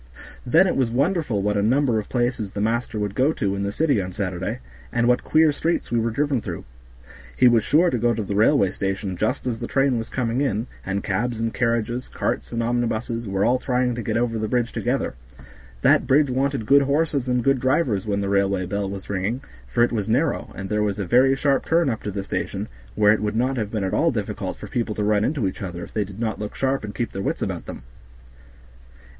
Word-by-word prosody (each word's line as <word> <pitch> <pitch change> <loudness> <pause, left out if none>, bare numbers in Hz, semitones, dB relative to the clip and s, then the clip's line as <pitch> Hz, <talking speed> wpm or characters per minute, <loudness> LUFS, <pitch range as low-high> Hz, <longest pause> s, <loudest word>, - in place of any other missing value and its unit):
Then 165 +9 +5
it 185 - 0
was 130 -3 +1
wonderful 140 - 0
what 105 0 +1
a 100 - +2
number 120 +1 +2
of 105 - -7
places 120 -4 -1
the - - -4
master 115 +2 -1
would 105 -2 -2
go 130 +6 +3
to 100 -8 -1
in 100 - -3
the 100 0 -1
city 140 -2 +1
on 90 0 -5
Saturday, 95 +3 -3 0.3
and 120 0 +1
what 125 0 +3
queer 155 -1 +4
streets 165 0 -1
we 120 - +2
were 115 +1 0
driven 140 +1 0
through. - - -6 0.7
He 125 - +6
was 115 -3 +4
sure 165 +7 +3
to 125 - 0
go 120 +1 +2
to 110 - -2
the 100 - -4
railway 105 -1 +4
station 95 0 -3
just 130 +10 -1
as 120 -3 -2
the 120 - -4
train 135 -3 +2
was 115 - -6
coming 125 0 -1
in, 115 -5 0 0.2
and 95 +1 -2
cabs 115 +4 -1
and 115 0 -1
carriages, 120 +1 -1
carts - - -3
and 115 0 -1
omnibuses 115 -1 -1
were 95 0 0
all 125 +2 +3
trying 125 -1 0
to 120 - -4
get 110 0 -1
over 115 -1 0
the 110 - -1
bridge 120 +1 0
together; 125 +3 -1 0.7
that - - +4
bridge 140 0 +4
wanted 135 -2 0
good 140 +4 +6
horses 140 -1 0
and 125 -1 +1
good 135 0 +3
drivers 130 - +1
when 100 -1 0
the 100 - -2
railway 100 -1 +1
bell 100 +1 -2
was 95 -1 -7
ringing, 100 +6 -2 0.3
for 90 - +2
it 120 - +2
was 110 -2 -2
narrow, 145 +7 0
and 95 - -5
there 105 +1 0
was 105 -1 0
a 100 - -2
very 130 +7 +4
sharp 135 0 +1
turn 165 -4 +2
up 110 - -4
to - - -4
the 100 0 -4
station, - - -3 0.3
where 105 0 +5
it 110 - -1
would 105 0 -1
not 130 +4 +1
have 110 -5 -2
been 110 -2 -2
at 95 - -2
all - - +3
difficult - - -3
for - - -8
people 115 -3 -2
to 105 - -1
run 105 0 +2
into 140 -3 0
each 95 - -5
other, 90 -3 -5
if - - -11
they 105 - +1
did 100 +1 -10
not 110 -2 -2
look 105 0 -5
sharp 135 -1 0
and 105 -1 -6
keep 120 - -2
their 95 - -4
wits - - -2
about - - -4
them. - - -8
115 Hz, 240 wpm, -23 LUFS, 105-130 Hz, 0.7 s, He